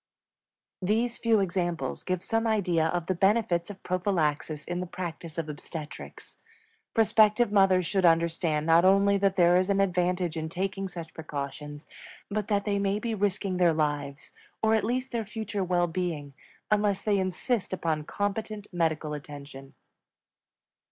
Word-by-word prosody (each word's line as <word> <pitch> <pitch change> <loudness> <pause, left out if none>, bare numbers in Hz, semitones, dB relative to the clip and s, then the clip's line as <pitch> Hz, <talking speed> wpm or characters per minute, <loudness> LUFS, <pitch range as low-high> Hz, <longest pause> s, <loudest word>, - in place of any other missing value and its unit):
These 225 +5 0
few 225 -3 +3
examples 175 -2 -2
give 185 -1 -2
some 225 0 0
idea 180 -7 +2
of 175 0 -2
the 185 - 0
benefits 190 -2 +2
of 195 -2 -10
prophylaxis 160 -5 -1
in 175 0 -3
the 180 - -3
practice 170 -2 -6
of 165 -2 -2
obstetrics. 150 0 -8 0.6
Prospective 220 0 +4
mothers 190 -3 +4
should 190 +3 +1
understand 165 -2 +2
not 165 +1 +5
only 200 +1 +5
that 195 -1 +2
there 175 -1 +5
is 185 +2 +1
an 200 0 +2
advantage 180 -2 +1
in 160 -1 -3
taking 195 +3 -3
such 170 -3 -8
precautions, 145 -1 -6 0.5
but 210 0 -1
that 200 -2 0
they 200 -1 0
may 200 0 +1
be 225 +2 -2
risking 200 -2 0
their 175 -2 +4
lives, 145 -2 -2 0.3
or 220 0 +4
at 220 - +2
least 255 +3 -1
their 235 -2 -1
future 210 -1 -4
well 175 -1 +2
being, 165 -5 -3 0.4
unless 205 -2 +2
they 205 -2 +2
insist 190 +4 -1
upon 160 -4 -1
competent 205 +3 -3
medical 160 -3 0
attention. 140 -2 -9
185 Hz, 150 wpm, -28 LUFS, 165-205 Hz, 0.6 s, not